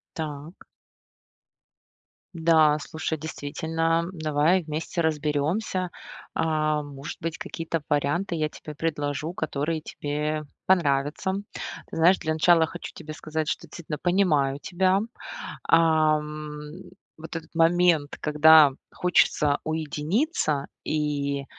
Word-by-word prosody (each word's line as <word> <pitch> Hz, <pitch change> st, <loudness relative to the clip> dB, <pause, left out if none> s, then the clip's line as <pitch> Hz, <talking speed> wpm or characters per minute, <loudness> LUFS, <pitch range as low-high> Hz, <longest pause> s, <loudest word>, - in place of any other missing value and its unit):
Так. 155 Hz, +1 st, -6 dB, 1.7 s
Да, 160 Hz, -2 st, +4 dB
слушай, 160 Hz, +1 st, -4 dB
действительно, 165 Hz, +2 st, -1 dB
давай 155 Hz, +2 st, +2 dB
вместе 160 Hz, +3 st, -3 dB
разберемся. 160 Hz, +5 st, 0 dB, 0.5 s
А 155 Hz, -1 st, +1 dB
может 145 Hz, 0 st, -8 dB
быть, 165 Hz, 0 st, -3 dB
какие-то 165 Hz, -1 st, -4 dB
варианты 150 Hz, +6 st, 0 dB
я 155 Hz, -1 st, 0 dB
тебе 150 Hz, 0 st, -10 dB
предложу, 150 Hz, 0 st, -2 dB
которые 155 Hz, -1 st, -2 dB
тебе 150 Hz, +1 st, -3 dB, 0.2 s
понравятся. 150 Hz, 0 st, +2 dB, 0.6 s
Знаешь, 175 Hz, +4 st, +4 dB
для 155 Hz, -, -1 dB
начала 160 Hz, 0 st, +4 dB
хочу -, -, -8 dB
тебе 155 Hz, -, -8 dB
сказать, 155 Hz, 0 st, -3 dB
что -, -, -2 dB
действительно 160 Hz, -3 st, -6 dB
понимаю 150 Hz, -7 st, +2 dB
тебя. 185 Hz, +3 st, +2 dB, 0.7 s
Ам, 155 Hz, -2 st, +2 dB, 0.6 s
вот 165 Hz, +1 st, -7 dB
этот 165 Hz, 0 st, -9 dB
момент, 165 Hz, -2 st, +3 dB
когда 150 Hz, -1 st, +7 dB, 0.2 s
хочется 150 Hz, -4 st, +2 dB
уединиться 155 Hz, -, -1 dB, 0.2 s
и 145 Hz, -2 st, -1 dB
155 Hz, 100 wpm, -26 LUFS, 150-165 Hz, 1.7 s, когда